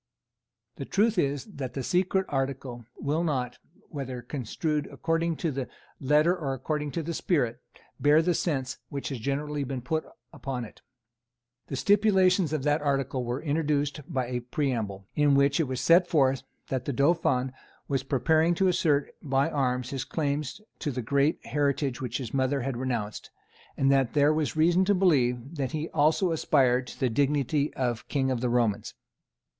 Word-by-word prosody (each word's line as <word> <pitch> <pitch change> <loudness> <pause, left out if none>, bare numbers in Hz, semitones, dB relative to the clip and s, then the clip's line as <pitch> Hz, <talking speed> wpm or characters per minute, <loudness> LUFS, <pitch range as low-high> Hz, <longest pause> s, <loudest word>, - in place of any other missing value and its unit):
The - - -5
truth 210 0 +2
is 140 -3 0
that 140 - -7
the 135 - -2
secret 185 +5 +1
article 135 -3 -3
will 150 +4 0
not, 130 -7 -2 0.3
whether 130 -4 -5
construed 150 +4 -2
according 165 0 -1
to 165 0 -2
the 135 -2 -4 0.3
letter 150 +6 +3
or 140 -7 -3
according 150 +3 -2
to 165 - -2
the 170 +2 -3
spirit, 140 -10 0 0.4
bear 150 +2 +5
the 175 +1 +2
sense 135 -7 -2
which 140 -1 -4
has 135 -4 -4
generally 145 +4 -2
been 130 -2 -4
put 160 +5 -1 0.3
upon 130 -3 -4
it. 110 - -15 0.9
The - - -4
stipulations 190 -1 +3
of 155 -4 -1
that 150 +1 +2
article 135 -3 0
were 120 +3 -3
introduced 150 -1 0
by 130 -4 0
a 125 0 -2
preamble, 120 -7 -2
in 145 -1 +4
which 140 +1 +3
it 160 - +3
was 130 -1 -3
set 175 +2 +5
forth 135 -6 +2 0.3
that 130 -2 -2
the 140 - -2
Dauphin 130 -2 +2 0.3
was 135 -2 0
preparing 160 +5 +2
to 190 +2 +3
assert 150 -5 +1
by 140 +1 +1
arms 125 -3 -1
his 135 -2 -2
claim 145 +1 -1 0.4
to 150 - -2
the 125 -3 -3
great 140 +6 +1
heritage 140 -1 0
which 125 -2 -2
his 125 -5 -6
mother 135 +1 +1
had 135 0 -2
renounced, 120 -4 -3 0.5
and 135 0 +3
that 135 -4 +2
there 145 +1 +5
was 155 -1 -1
reason 170 +4 +4
to 205 +1 +3
believe 140 -5 +1
that 135 -3 -2
he 155 +1 -3
also 160 +4 +2
aspired 130 -5 +2
to - - -10
the 130 - +2
dignity 145 +3 +1
of 120 -4 -2
King 135 -2 0
of 125 -2 -1
the 125 - 0
Romans. 120 -4 0
140 Hz, 170 wpm, -27 LUFS, 130-155 Hz, 0.9 s, bear